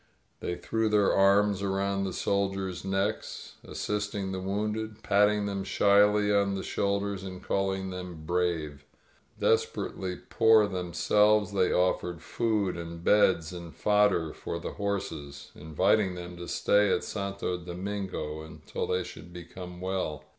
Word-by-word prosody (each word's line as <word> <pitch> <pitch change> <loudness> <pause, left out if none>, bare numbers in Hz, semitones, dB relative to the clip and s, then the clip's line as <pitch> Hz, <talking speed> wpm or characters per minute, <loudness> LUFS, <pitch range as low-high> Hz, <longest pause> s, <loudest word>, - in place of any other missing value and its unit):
They 90 - -3
threw 110 +4 -1
their 105 -2 +3
arms 100 0 +4
around 100 0 0
the 95 - -2
soldiers' 95 -2 -1
necks, 95 +3 -3
assisting 105 -2 -3
the 95 - -3
wounded, 105 +3 -3
patting 105 0 +3
them 100 -1 -2
shyly 105 +1 +4
on 100 -1 +2
the 95 - -4
shoulders 100 -1 -1
and 95 -1 -8
calling 95 -1 -1
them 90 -4 -7
"brave." 80 -4 -1 0.6
Desperately 95 -1 0
poor 110 0 +4
themselves, 105 +2 +2
they 95 -2 +2
offered 90 -2 0
food, 105 -6 0
and 85 0 -7
beds, 95 -5 +3
and 85 -2 -8
fodder 105 -6 +2
for - - -5
the 85 - -5
horses, 95 -9 -4
inviting 90 +5 +1
them 90 0 -7
to 85 0 -7
stay 105 -1 +3
at - - +1
Santo 100 -3 -3
Domingo 90 -3 -4
until 80 0 -6
they 90 0 0
should 85 0 -11
become 90 +1 -9
well. 95 -5 -3
95 Hz, 135 wpm, -29 LUFS, 90-105 Hz, 0.6 s, arms